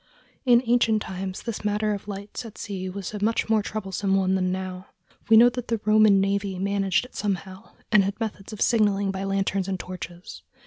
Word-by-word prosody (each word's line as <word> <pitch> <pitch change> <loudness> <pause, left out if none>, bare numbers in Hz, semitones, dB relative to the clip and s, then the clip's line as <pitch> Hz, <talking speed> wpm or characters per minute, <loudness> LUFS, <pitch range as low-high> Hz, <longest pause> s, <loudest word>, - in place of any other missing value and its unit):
In 240 0 +6
ancient 230 -2 +3
times 190 0 -5
this 230 -3 -5
matter 210 0 0
of 200 0 -6
lights 200 +3 -6
at 225 -2 -11
sea 190 -3 -5
was 195 +2 -6
a 205 -1 -4
much 225 +1 +1
more 220 -1 +3
troublesome 195 -1 -2
one 190 -1 +2
than 185 -1 +1
now. 185 0 -5 0.4
We 225 - +8
know 240 +2 +8
that 245 -1 -6
the 230 -1 -1
Roman 215 -2 +5
navy 195 0 0
managed 195 +2 0
it 250 - -16
somehow, 190 0 -4 0.2
and 210 -3 +6
had 195 +3 -3
methods 215 -2 -5
of 215 - -8
signaling 205 -4 +2
by 190 0 -4
lanterns 195 -1 0
and 190 -1 -2
torches. 180 -1 -8
200 Hz, 195 wpm, -25 LUFS, 190-215 Hz, 0.4 s, We